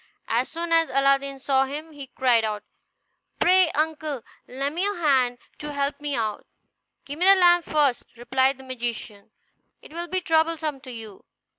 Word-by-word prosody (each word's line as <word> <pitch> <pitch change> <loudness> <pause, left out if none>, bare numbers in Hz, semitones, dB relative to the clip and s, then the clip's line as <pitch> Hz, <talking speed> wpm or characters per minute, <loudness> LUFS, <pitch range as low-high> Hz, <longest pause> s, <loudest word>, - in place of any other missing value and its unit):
As 235 +3 0
soon 335 0 -5
as 330 0 +4
Aladdin 275 0 +1
saw 270 0 +1
him, 300 +4 -7
he 285 -3 -10
cried 250 -3 +2
out, 210 -1 -3 0.8
"Pray, 370 -1 +5
uncle, 305 -4 -2 0.2
lend 275 +3 -3
me 345 - -3
your 410 -1 -1
hand, 260 -7 +2 0.2
to 295 0 -6
help 280 0 -2
me 290 -1 -2
out." 215 -3 -3 0.6
"Give 290 +2 -7
me 365 - +3
the 390 - +9
lamp 350 -2 +4
first," 285 -5 +1 0.2
replied 260 +2 +1
the 265 - -13
magician; 235 -5 -6 0.5
"it - - -16
will 340 +1 -5
be 370 +2 -1
troublesome 320 -3 0
to 260 -2 -10
you." 220 -4 -10
280 Hz, 170 wpm, -24 LUFS, 255-320 Hz, 0.8 s, the